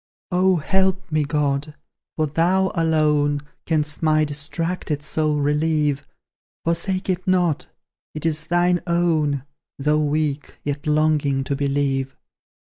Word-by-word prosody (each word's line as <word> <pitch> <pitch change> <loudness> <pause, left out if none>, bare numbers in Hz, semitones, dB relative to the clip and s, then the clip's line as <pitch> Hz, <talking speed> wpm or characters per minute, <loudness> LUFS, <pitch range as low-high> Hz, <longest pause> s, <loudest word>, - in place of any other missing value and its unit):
Oh, 185 +1 +4
help 190 +2 0
me, 155 -1 +2
God! 145 0 -1 0.4
For 155 - +1
thou 180 +5 +2
alone 150 -4 +2 0.3
Canst 155 -2 0
my 155 -1 +3
distracted 150 +1 -3
soul 155 0 0
relieve; 150 -1 +1 0.6
Forsake 175 +3 -1
it 185 +1 -2
not: 180 -5 +1 0.5
it 155 - -5
is 160 0 -1
thine 175 0 +2
own, 160 -5 +1 0.3
Though 150 +2 +2
weak, 150 -1 -1
yet 145 +1 -3
longing 150 -3 +2
to 140 - -2
believe. 135 -1 -1
155 Hz, 120 wpm, -22 LUFS, 145-170 Hz, 0.6 s, Oh